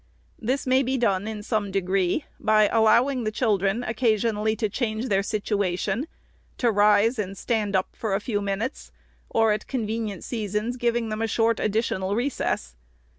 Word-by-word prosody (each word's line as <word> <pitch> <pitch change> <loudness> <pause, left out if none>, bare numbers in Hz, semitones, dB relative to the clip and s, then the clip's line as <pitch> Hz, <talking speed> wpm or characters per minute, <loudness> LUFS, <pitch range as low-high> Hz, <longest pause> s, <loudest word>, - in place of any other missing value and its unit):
This 255 +5 -1
may 260 +1 +4
be 265 0 0
done, 205 -4 +1
in 215 -1 -5
some 210 -2 -1
degree, 195 - 0
by 215 -1 +4
allowing 240 +3 +3
the 215 - 0
children 210 -1 +1
occasionally 220 -2 +1
to 220 -1 0
change 220 +2 -2
their 195 -1 +3
situation, 200 - -1 0.5
to 240 -2 +2
rise 210 +3 +4
and 195 -1 -3
stand 215 -4 -1
up 185 0 -1
a 200 -3 0
few 210 -2 -2
minutes; 200 +6 -3 0.4
or, 225 -1 +3
at 210 - -4
convenient 220 -6 -3
seasons, 215 +1 -2
giving 235 -1 0
them 215 +1 -3
a 225 - +1
short 225 0 +1
additional 200 -2 0
re 245 +5 +1
eess. 65 - -2
215 Hz, 160 wpm, -25 LUFS, 200-235 Hz, 0.5 s, may